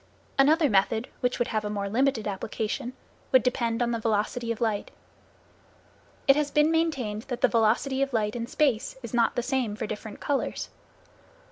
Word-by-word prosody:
Another 305 +3 +5
method 220 +3 +1
which 250 -1 0
would 240 - 0
have 215 -1 -1
a 210 - -3
more 200 -1 -2
limited 235 +1 +1
application, 215 +4 -3 0.4
would 260 -3 +6
depend 235 -2 0
on 240 - 0
the 230 - -1
velocity 225 +2 -1
of 230 - -4
light. 220 -3 -1 1.4
It 275 - +7
has 295 -1 +1
been 300 +2 +3
maintained 275 -11 0
that 245 -3 -4
the - - +6
velocity 235 +4 +2
of 275 0 +1
light 215 -2 0
in 235 -1 -3
space 265 -4 +1
is 235 - -7
not 235 -1 +2
the 245 - 0
same 255 -5 -1
for - - -3
different 210 0 -7
colors. 280 -2 -2
235 Hz, 175 wpm, -27 LUFS, 215-270 Hz, 1.4 s, It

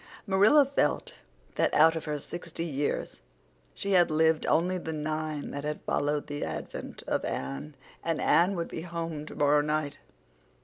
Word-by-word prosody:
Marilla 210 +9 +6
felt 280 - 0 0.4
that - - +3
out 160 +2 +6
of 160 - -4
her 150 -1 -2
sixty 170 +2 -5
years 145 -3 -2 0.5
she 200 - -3
had 175 -3 +5
lived 160 0 +2
only 180 +3 +2
the 160 - -5
nine 155 -1 -3
that 140 - -5
had 150 0 -3
followed 145 0 0
the 145 0 -4
advent 75 -2 -6
of - - -1
Anne. 70 +3 -4 0.3
And - - -1
Anne 180 +4 +4
would 170 -1 -3
be - - -5
home 165 -3 -5
tomorrow 145 0 +3
night. 150 -1 -2
155 Hz, 160 wpm, -29 LUFS, 145-170 Hz, 0.5 s, Marilla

